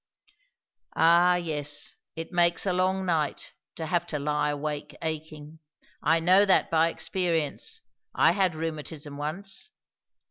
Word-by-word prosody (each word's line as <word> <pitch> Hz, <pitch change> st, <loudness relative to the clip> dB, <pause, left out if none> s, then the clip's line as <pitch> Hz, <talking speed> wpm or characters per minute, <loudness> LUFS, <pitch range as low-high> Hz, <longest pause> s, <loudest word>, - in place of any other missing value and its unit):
"Ah, 175 Hz, +2 st, +5 dB
yes; 150 Hz, -4 st, -3 dB, 0.2 s
it 165 Hz, +1 st, -6 dB
makes 175 Hz, 0 st, +2 dB
a 185 Hz, -, +1 dB
long 185 Hz, +1 st, +1 dB
night, 160 Hz, -5 st, -1 dB, 0.2 s
to 160 Hz, -, -4 dB
have 175 Hz, +1 st, 0 dB
to 150 Hz, -, -3 dB
lie 150 Hz, +1 st, 0 dB
awake 145 Hz, 0 st, -4 dB
aching! 155 Hz, -1 st, -5 dB, 0.4 s
I 165 Hz, +2 st, +3 dB
know 185 Hz, +4 st, +5 dB
that 195 Hz, -2 st, +3 dB
by 165 Hz, 0 st, +4 dB
experience. 175 Hz, -, -2 dB, 0.3 s
I 165 Hz, -, +5 dB
had 185 Hz, -2 st, +1 dB
rheumatism 155 Hz, -2 st, -5 dB
once." 190 Hz, -, -4 dB
165 Hz, 130 wpm, -27 LUFS, 150-180 Hz, 0.4 s, Ah